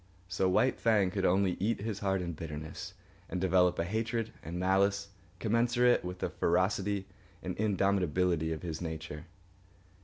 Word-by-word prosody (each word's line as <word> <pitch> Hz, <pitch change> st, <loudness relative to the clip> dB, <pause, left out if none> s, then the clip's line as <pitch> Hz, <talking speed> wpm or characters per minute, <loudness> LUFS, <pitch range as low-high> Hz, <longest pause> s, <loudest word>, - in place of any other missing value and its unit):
So 95 Hz, +1 st, +1 dB
White 125 Hz, +8 st, +2 dB
Fang 105 Hz, -5 st, +3 dB
could 95 Hz, 0 st, -1 dB
only 95 Hz, 0 st, +2 dB
eat 105 Hz, +2 st, 0 dB
his 105 Hz, -2 st, -3 dB
heart 95 Hz, -2 st, 0 dB
in 85 Hz, -1 st, -3 dB
bitterness 75 Hz, -1 st, -7 dB, 0.3 s
and 90 Hz, -, -2 dB
develop 90 Hz, -1 st, +3 dB
a -, -, +1 dB
hatred 115 Hz, +4 st, -2 dB
and 85 Hz, +2 st, -6 dB
malice 100 Hz, +2 st, +2 dB, 0.3 s
commensurate 120 Hz, +4 st, +3 dB
with 90 Hz, +1 st, -5 dB
the -, -, -2 dB
ferocity 95 Hz, +2 st, +1 dB, 0.4 s
and 90 Hz, -, -3 dB
indomitability 90 Hz, -5 st, +1 dB
of 80 Hz, +1 st, -4 dB
his 80 Hz, -2 st, -4 dB
nature. 80 Hz, -2 st, -6 dB
95 Hz, 150 wpm, -31 LUFS, 90-100 Hz, 0.4 s, Fang